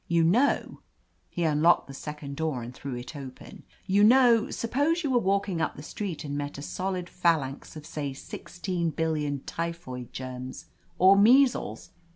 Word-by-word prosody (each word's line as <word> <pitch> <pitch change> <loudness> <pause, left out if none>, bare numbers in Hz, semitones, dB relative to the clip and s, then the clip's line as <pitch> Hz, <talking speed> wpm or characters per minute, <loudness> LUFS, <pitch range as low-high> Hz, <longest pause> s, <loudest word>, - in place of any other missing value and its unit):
You 170 -1 +3
know," 235 +13 +2 0.3
— - - -43
he 175 - -3
unlocked 160 +2 +4
the 135 - -10
second 150 0 -7
door 150 -6 -2
and 120 +2 -8
threw 135 0 -6
it 120 +5 -8
open, 135 -3 -10 0.2
"you 200 +2 +3
know, 240 0 +6
suppose 290 +9 0
you 285 - 0
were 245 - +4
walking 195 -4 0
up - - -1
the 145 - -9
street 180 0 -5
and 145 0 -4
met 145 0 -4
a 140 - -7
solid 185 +1 -3
phalanx 160 -8 -1
of 155 -1 -9
say 145 -3 -4
sixteen 175 +4 -4
billion 150 -3 -1
typhoid 165 -9 -5
germs, 130 0 -7 0.3
or 190 +2 +7
measles! 250 +6 +3
165 Hz, 170 wpm, -27 LUFS, 140-195 Hz, 0.3 s, or